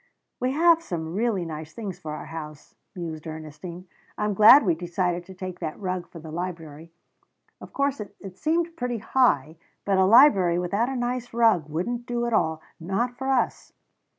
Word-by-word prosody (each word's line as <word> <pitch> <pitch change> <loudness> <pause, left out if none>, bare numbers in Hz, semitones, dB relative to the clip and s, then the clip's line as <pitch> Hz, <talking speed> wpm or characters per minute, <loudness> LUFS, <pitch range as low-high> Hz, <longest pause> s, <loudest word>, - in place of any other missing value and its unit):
"We 255 +1 0
have 330 +2 +5
some 165 - -5
really 205 -3 0
nice 155 -1 -7
things 200 -4 -6
for 155 -1 -6
our - - -8
house," 155 -2 -9 0.2
mused 165 -3 -6
Ernestine. 160 +3 -8 0.3
"I'm 210 0 0
glad 220 +8 +8
we 175 - +3
decided 175 +1 -2
to 190 - -11
take 185 -1 -7
that 160 -3 -5
rug 185 -3 -3
for - - -12
the 160 -1 -9
library. 165 -2 -6 0.7
Of - - -11
course 280 -3 -1 0.2
it 190 -2 -10
seemed 330 - -1
pretty 245 -4 -2
high, 165 - +1 0.3
but 195 -1 +2
a 190 - +5
library 195 -6 +6
without 200 +7 0
a 270 - -3
nice 245 -1 -3
rug 220 -10 +3
wouldn't 235 +10 -3
do 240 0 -1
at 235 - -2
all 160 -5 +1 0.2
not 205 +9 -2
for 265 +2 -4
us." 265 -2 0
185 Hz, 180 wpm, -25 LUFS, 165-240 Hz, 0.7 s, glad